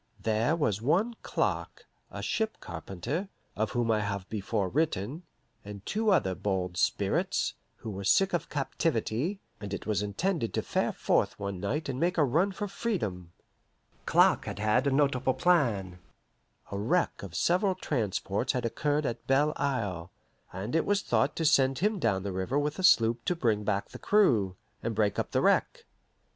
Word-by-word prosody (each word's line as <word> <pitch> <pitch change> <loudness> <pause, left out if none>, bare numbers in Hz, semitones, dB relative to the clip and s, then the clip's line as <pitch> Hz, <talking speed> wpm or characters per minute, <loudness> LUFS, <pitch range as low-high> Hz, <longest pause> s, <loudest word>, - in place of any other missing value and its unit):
There 110 - +1
was 110 - 0
one 195 - +1
Clark, - - -2 0.2
a - - -7
ship 220 -1 -1
carpenter 95 - -5 0.3
(of 110 +2 -1
whom 120 -2 +1
I 110 - +2
have 100 -2 -3
before 105 -1 -1
written), 145 - -1 0.4
and 100 -1 -9
two 220 +1 0
other 130 - +3
bold 90 -2 -2
spirits, - - 0 0.2
who 110 - -7
were 100 0 -6
sick 195 - +3
of 175 - -1
captivity, 145 - -1 0.2
and 100 -1 -4
it - - -8
was 105 -3 0
intended 115 - -1
to - - 0
fare - - 0
forth - - 0
one 100 -2 -4
night 130 - -2
and 130 -2 -3
make 175 +3 +1
a 155 - +5
run 165 +9 +2
for 205 +2 -4
freedom. 105 - -3 0.8
Clark - - +4
had - - -5
had 110 +6 +2
a - - +2
notable 135 -2 +2
plan. 110 - +1 0.7
A 100 - -3
wreck 170 - 0
of 95 -4 -8
several 185 +2 +2
transports 105 - -1
had 125 -3 -1
occurred 145 +5 0
at 115 -2 -4
Belle 145 +3 +3
Isle, 100 -12 -2 0.4
and 100 - -4
it 165 - +3
was 205 0 +2
thought 120 +5 +1
to 160 - -1
send 135 -3 +4
him 210 +2 +1
down 100 - +1
the 100 - -3
river 95 +9 -1
with 145 +4 -1
a - - -3
sloop 115 -9 +5
to 180 - +1
bring 110 -9 +1
back 100 -1 -1
the - - -10
crew, 115 - +3 0.3
and 115 -1 -3
break 105 -1 +1
up - - -2
the - - +1
wreck. - - +2
120 Hz, 175 wpm, -29 LUFS, 100-160 Hz, 0.8 s, a